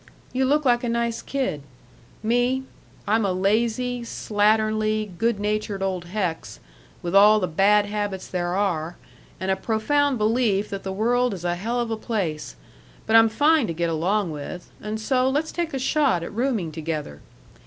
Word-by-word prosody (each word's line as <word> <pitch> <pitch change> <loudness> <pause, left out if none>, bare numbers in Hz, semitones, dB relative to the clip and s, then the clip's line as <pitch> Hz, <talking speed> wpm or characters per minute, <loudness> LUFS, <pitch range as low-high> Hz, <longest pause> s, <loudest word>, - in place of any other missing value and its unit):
You 260 +1 +1
look 295 +2 +2
like 240 -1 +3
a 240 - -1
nice 235 0 -1
kid 260 - -2 0.6
me, 245 +3 +1 0.4
I'm 220 +2 +2
a 195 - +1
lazy, 230 +6 0
slatternly, 215 -1 +1
good 230 -2 +1
natured 210 -1 -2
old 185 -2 -2
hex, 175 - -3 0.4
with 175 0 -3
all 210 +2 +7
the 185 - 0
bad 205 +5 +3
habits 205 -2 -3
there 175 -1 -2
are 175 -4 -1 0.4
and 190 +1 -1
a - - +2
profound 255 +7 +1
belief 215 -2 +1
that 195 -1 -4
the 190 - -5
world 240 +3 +1
is 180 -1 -8
a 175 - +1
hell 225 +8 -2
of 235 -1 -2
a 225 - -1
place, 190 -9 -3 0.5
but 220 - +2
I'm 225 0 +7
fine 295 +3 +3
to 165 - -3
get 170 0 0
along 180 +3 0
with, 150 +4 -7
and 215 +1 -4
so 255 +3 +1
let's 300 +4 -1
take 340 -2 -2
a 270 - -2
shot 265 - +1
at 170 - -7
rooming 225 -8 -1
together. 155 - -5
215 Hz, 175 wpm, -24 LUFS, 185-240 Hz, 0.6 s, all